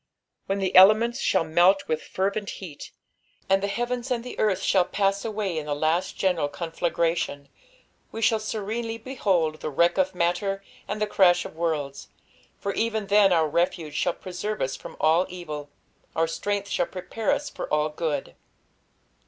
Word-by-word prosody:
When 195 - 0
the 190 -2 -1
elements 215 +6 +7
shall 190 - +2
melt 175 +5 +3
with 155 0 -1
fervent 200 +2 -2
heat, 165 -7 -9 0.6
and 195 0 +3
the 200 - 0
heavens 240 +4 -2
and 240 -2 -1
the 250 - -7
earth 195 -3 +1
shall 190 -2 +4
pass 195 +2 0
away 210 -6 -2
in 150 - -7
the 145 - -1
last 160 +4 0
general 175 -6 +1
ronflagrsrion, 165 -3 -2 0.6
we 225 - -6
shall 225 0 +3
serenely 220 +2 -3
behold 190 -10 0
"the - - -4
wreck 170 +6 +2
of 190 0 +1
matter, 180 +3 0 0.2
and 210 - -3
the 210 - +2
crash 180 -4 +4
of - - -9
worlds," 155 -4 -2 0.5
for 200 - -3
even 220 -2 -1
then 205 -2 +6
our 165 -3 +3
refuge 165 -1 -1
shall 170 +3 0
preserve 205 +4 -5
us 135 - -1
from - - -10
all 165 +4 +3
evil, 155 -5 -7 0.5
our 165 - +3
strength 200 +5 -2
shall 175 -3 0
prepare 190 +7 -3
us 285 +1 -1
for - - -6
all 150 0 +2
good. 150 - -3
185 Hz, 170 wpm, -25 LUFS, 165-210 Hz, 0.6 s, elements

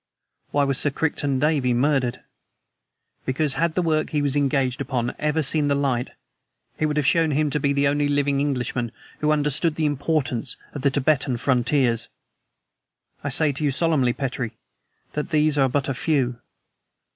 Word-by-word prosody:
Why 145 - +1
was 135 -2 +1
Sir 145 - +2
Crichton 145 -2 -1
Davey 135 -3 +1
murdered? 130 -1 +1 1.0
Because, 135 +2 0
had 165 +2 0
the 180 - +1
work 155 -2 +1
he 150 -2 0
was 140 -1 +1
engaged 135 -2 +1
upon 125 -3 -2
ever 150 +1 0
seen 150 +1 +2
the 140 - +2
light 130 -3 0 0.7
it 155 - +2
would 150 0 -2
have 150 - +1
shown 165 +1 +3
him 150 0 +1
to 150 - +1
be 140 0 +1
the 140 0 +2
only 145 +1 +1
living 145 -1 +1
Englishman 125 -4 -2 0.3
who 150 - 0
understood 150 +2 +1
the 155 - 0
importance 145 -4 -1 0.2
of 145 - -5
the 140 - +3
Tibetan 135 -2 +1
frontiers. 125 -2 +1 1.2
I 145 - -2
say 150 +2 +3
to 140 +3 -3
you 145 - +3
solemnly, 140 -4 +1
Petrie, 125 -4 -4 0.6
that 150 +3 -3
these 155 -2 +2
are 135 -2 +3
but 140 +1 -1
a 135 - -1
few. 125 -4 0
140 Hz, 170 wpm, -23 LUFS, 130-150 Hz, 1.2 s, shown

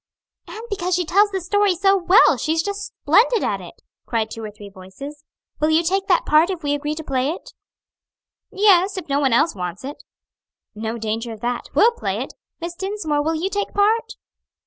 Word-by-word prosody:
"And 435 - -8
because 365 -2 -1
she 360 0 0
tells 400 +5 +4
the 385 -1 -2
story 405 +1 +1
so 390 +3 +3
well; 380 +4 +5
she's 320 +1 0
just 405 0 -4 0.2
splendid 430 +9 +4
at - - -1
it!" - - -13 0.2
cried 220 -2 -1
two 225 - -7
or 215 - -5
three 210 0 -12
voices. 200 +11 -11 0.4
"Will 305 - +2
you 320 +2 +3
take 385 +3 0
that 360 - +3
part 310 +4 +4
if 365 -4 -4
we 290 0 0
agree 295 +1 -2
to 320 - -6
play 265 -1 -1
it?" 335 - -7 1.0
"Yes, 390 -1 +4
if 375 - -6
no 280 0 +1
one 270 -3 +2
else 270 +8 +3
wants 180 +1 -6
it." 285 +2 -7 0.7
"No 220 +2 -4
danger 225 +1 -3
of 215 - -12
that. 240 0 -3
We'll 465 - +6
play 475 - -3
it. - - -5 0.3
Miss 340 0 -5
Dinsmore, 370 -5 -2
will 320 +2 0
you 330 +4 -1
take 405 0 -3
part?" 450 +3 +2
330 Hz, 200 wpm, -21 LUFS, 265-390 Hz, 1.0 s, We'll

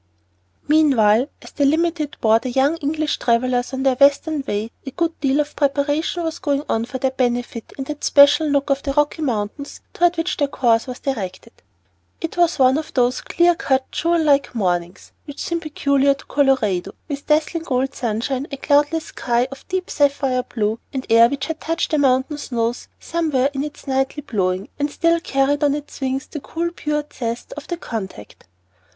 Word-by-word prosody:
MEANWHILE, 265 -5 +4
as - - -12
the 290 - -1
"Limited" 315 0 0
bore 220 0 +4
the 255 - -5
young 270 +5 +2
English 305 0 -1
travellers 245 +1 +1
on 265 0 -3
their 270 -1 +4
western 285 +3 +3
way, 210 +3 -2
a 270 - -5
good 330 +4 -2
deal 275 0 +1
of 300 0 -2
preparation 290 +4 0
was 325 0 -3
going 285 -4 0
on 225 +1 0
for 260 +2 -5
their 260 0 0
benefit 245 -2 -2
in 270 - -3
that 295 +2 -7
special 290 +2 +6
nook 280 0 +1
of 275 0 +1
the 275 - -2
Rocky 295 +2 +1
mountains 245 +1 -3
toward 350 0 +2
which 330 +2 -1
their 285 - +1
course 235 -3 +1
was 250 0 -6
directed. 215 -5 -4 0.7
It 330 - -4
was 345 -1 +2
one 265 +2 +4
of 315 - -9
those 250 -1 +2
clear 345 0 +3
cut, 265 -5 -1
jewel 335 +1 +1
like 280 -4 +2
mornings 175 -4 -2
which 285 -2 -9
seem 340 0 -2
peculiar 280 -3 +1
to - - -16
Colorado, 215 -10 +1
with 285 -2 -6
dazzling 315 +2 +1
gold 265 -2 0
sunshine, 250 +4 -2
a 275 - -4
cloudless 295 +3 +2
sky 240 +1 -1
of 275 - -11
deep 370 0 -2
sapphire 280 -3 +1
blue, 220 -2 -2
and 265 -1 -4
air 230 +1 +7
which 275 0 -3
had 320 0 -5
touched 330 +1 -1
the 305 - +2
mountain 270 +2 +2
snows 235 -3 -2
somewhere 300 -5 0
in 275 0 -2
its 295 0 -8
nightly 270 +2 -1
blowing, 190 -6 -1
and 290 +1 0
still 335 +2 +2
carried 280 -1 0
on 285 -1 +3
its 295 -1 -8
wings 265 0 -1
the 300 - -7
cool 335 +4 -3
pure 300 -3 -2
zest 235 -1 -4
of 295 - -9
the 345 - -3
contact. 190 - -7
275 Hz, 185 wpm, -21 LUFS, 250-300 Hz, 0.7 s, air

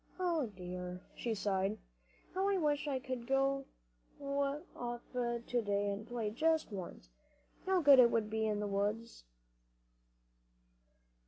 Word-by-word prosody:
"O 335 -7 +1
dear," 180 -2 -6
she 230 -2 -2
sighed, 195 0 0 0.6
"how 385 +2 +1
I 395 - +2
wish 295 -3 +1
I 275 -2 0
could 255 -2 -5
go 275 0 +2 0.5
off 280 -3 -3
to 240 0 -1
day 205 -1 0
and 205 +2 -5
play 230 -3 -2
just 315 +4 +1
once! 175 - -7 0.6
How 380 -1 +3
good 280 -2 +9
it 240 -2 +8
must 220 -2 0
be 220 0 +1
in 210 -1 0
the - - -1
woods!" 205 - -2
235 Hz, 135 wpm, -35 LUFS, 205-280 Hz, 0.6 s, good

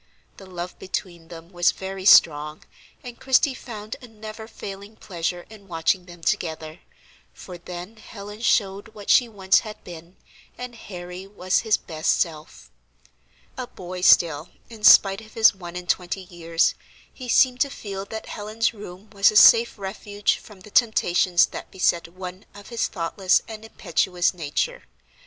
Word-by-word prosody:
The 195 - -13
love 180 -1 -7
between 175 -3 -5
them 165 0 -11
was 175 -2 +2
very 190 0 -7
strong, 150 -5 +5 0.4
and 245 -1 -10
Christie 270 +1 +3
found 215 -4 -8
a 250 - -11
never 220 0 -10
failing 200 -1 -9
pleasure 175 -3 -4
in 210 -2 -15
watching 175 +1 0
them 175 -1 -14
together, 160 -1 -3 0.6
for 180 -2 -10
then 180 +5 -9
Helen 210 0 -10
showed 205 -1 0
what 205 -1 -2
she 245 -2 +5
once 190 -3 +3
had 215 -1 -10
been, 170 +1 -11 0.4
and 250 -1 -7
Harry 180 -3 -9
was 185 -2 0
his 220 -2 +2
best 160 -2 -1
self. 155 - -4 0.9
A 255 - -4
boy 180 -3 -8
still, 165 -3 +4 0.2
in 220 -2 -12
spite 195 0 +7
of 220 0 -16
his 220 -1 +6
one 175 -2 -10
and 180 0 -7
twenty 180 +1 -1
years, 170 -2 0 0.4
he 255 -2 -9
seemed 250 +1 +4
to 280 - +3
feel 200 -7 -6
that 220 +2 -7
Helen's 220 +2 -2
room 200 -1 -11
was 200 -1 +4
a 215 - -4
safe 230 +3 +7
refuge 205 +1 -2
from 205 -3 -15
the 210 - -14
temptations 185 -6 +3
that - - -9
beset 175 -2 0
one 185 +2 -9
of 205 -1 -12
his 235 -1 -1
thoughtless 185 +1 0
and 220 -1 -9
impetuous 180 -4 0
nature. 180 - -3
195 Hz, 160 wpm, -23 LUFS, 175-215 Hz, 0.9 s, spite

